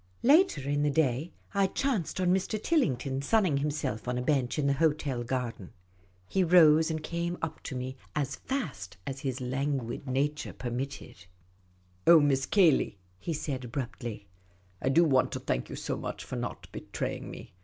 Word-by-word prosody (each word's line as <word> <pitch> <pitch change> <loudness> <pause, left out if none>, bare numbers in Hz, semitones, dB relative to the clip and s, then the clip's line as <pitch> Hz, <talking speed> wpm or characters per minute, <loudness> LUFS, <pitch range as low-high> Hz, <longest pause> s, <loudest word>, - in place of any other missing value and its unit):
Later 280 - +4
in 145 0 +1
the 145 - +2
day, 145 +1 +1 0.2
I 200 -1 +3
chanced 220 - -1
on 180 -1 +3
Mr. 190 +3 0
Tillington, 135 - +1
sunning 180 -1 +2
himself 145 -6 -2
on 125 0 -1
a - - -1
bench 130 -3 +1
in 150 - +1
the 140 - +3
hotel 145 -4 +1
garden. 120 -6 -4 0.5
He 190 - +2
rose, 160 -2 +6
and 160 -1 -3
came 170 +1 -2
up 160 -1 -3
to 135 - -6
me, 130 +1 -4 0.2
as 140 -2 -1
fast 140 - -4
as 135 0 -4
his 135 -2 -3
languid 130 0 -2
nature 145 +4 -1
permitted. 125 -6 -5 0.4
" 90 0 -35
Oh, 170 -1 +9
Miss 135 -3 +2
Cayley," 170 - +4 0.2
he 170 - -4
said, 140 -4 -3
abruptly, 120 -5 -5 0.3
" 90 0 -34
I - - +1
do 165 +6 +5
want 135 -5 +3
to - - -2
thank - - -2
you - - -5
so - - -3
much - - -5
for - - -6
not - - -5
betraying - - -4
me. - - -10
140 Hz, 175 wpm, -29 LUFS, 125-160 Hz, 0.5 s, Oh